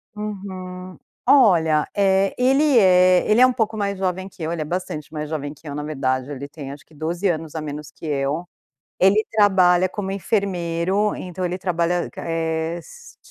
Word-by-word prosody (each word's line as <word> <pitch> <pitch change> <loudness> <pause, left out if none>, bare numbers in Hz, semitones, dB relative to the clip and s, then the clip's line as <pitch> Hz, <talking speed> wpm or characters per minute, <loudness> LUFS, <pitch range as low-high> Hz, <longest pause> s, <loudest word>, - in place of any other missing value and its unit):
Uhum, 185 -3 -7 0.3
olha, 165 - +5
eh, 195 -1 +2
ele 270 +2 +3
é 185 -2 +5
ele 215 +3 +5
é - - +9
um 255 - +2
pouco 220 -2 -1
mais 200 -1 -1
jovem 190 0 -2
que 185 - -16
eu. 160 - -2
Ele 170 -2 -3
é - - -2
bastante 155 -3 -4
mais 150 -1 -4
jovem 145 -2 -4
que 155 +1 -16
eu. 145 - -5
Na 150 - -4
verdade, 135 -2 -2
ele 140 0 -6
tem, 145 -1 -8
acho 140 +1 -11
que 160 - -23
12 170 +6 -2
anos 160 -1 -3
a 160 - -3
menos 150 0 -7
que 160 - -12
eu. 145 +3 -1 0.5
Ele 200 +4 +4
trabalha 185 -4 +4
como 190 0 -5
enfermeiro, 195 0 0
então 185 0 -5
ele 180 +1 -2
trabalha, 175 -1 0
eh, 165 0 -2
s 470 - -14
180 Hz, 185 wpm, -22 LUFS, 155-195 Hz, 0.5 s, é